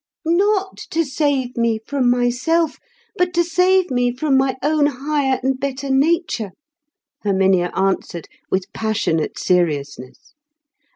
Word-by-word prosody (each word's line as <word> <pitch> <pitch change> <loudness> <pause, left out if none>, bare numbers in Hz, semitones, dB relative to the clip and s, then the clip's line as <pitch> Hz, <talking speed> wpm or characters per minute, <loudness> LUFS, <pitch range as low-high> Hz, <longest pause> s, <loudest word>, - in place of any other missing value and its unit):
"Not 385 +3 +1
to 330 0 0
save 270 -3 -1
me 230 -1 +1
from 270 -4 +1
myself, 255 +7 +1 0.4
but 360 0 0
to 345 - +4
save 365 +1 +2
me 245 -1 +1
from 270 +3 0
my 265 0 +2
own 300 0 +3
higher 275 -1 -1
and 265 0 0
better 275 0 -3
nature," 275 - +1 0.7
Herminia 190 -3 +2
answered 190 -3 -1 0.2
with 185 -1 -2
passionate 215 -8 -1
seriousness. 145 - -2
265 Hz, 120 wpm, -20 LUFS, 220-315 Hz, 0.7 s, to